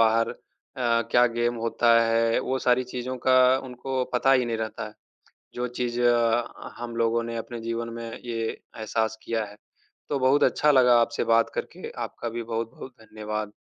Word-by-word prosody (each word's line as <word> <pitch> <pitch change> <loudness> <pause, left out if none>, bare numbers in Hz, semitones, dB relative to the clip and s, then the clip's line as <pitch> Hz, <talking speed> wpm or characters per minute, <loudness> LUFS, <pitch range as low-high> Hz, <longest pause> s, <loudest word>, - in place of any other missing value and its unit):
बाहर 115 0 +3
अ, 115 -2 -3
क्या 120 0 +5
गेम 120 0 0
होता 115 +1 +2
है, 115 0 +2
वो 130 - -1
सारी 125 0 +2
चीज़ों 125 +1 -5
का 130 +1 +5
उनको 130 +1 -3
पता 135 +2 +4
ही 130 -2 +4
नहीं 115 -1 -1
रहता 110 0 -4
है, 105 - -16 0.6
जो 125 0 -2
चीज़ 120 -1 -1 0.8
हम 120 -1 -6
लोगों 115 0 +1
ने 115 0 -5
अपने 115 +1 -6
जीवन 115 +1 -3
में 115 0 -6
ये 115 -1 -3
एहसास 110 0 -3
किया 115 -1 -1
है। 105 0 -12 0.5
तो 140 - 0
बहुत 130 +2 +4
अच्छा 150 - +3
लगा 125 -3 +6
आपसे 115 - 0
बात 115 0 +4
करके, - - -5
आपका 120 - -5
भी 120 +1 -4
बहुत-बहुत 115 +3 -5
धन्यवाद। 110 -1 -5
115 Hz, 170 wpm, -26 LUFS, 115-125 Hz, 0.8 s, लगा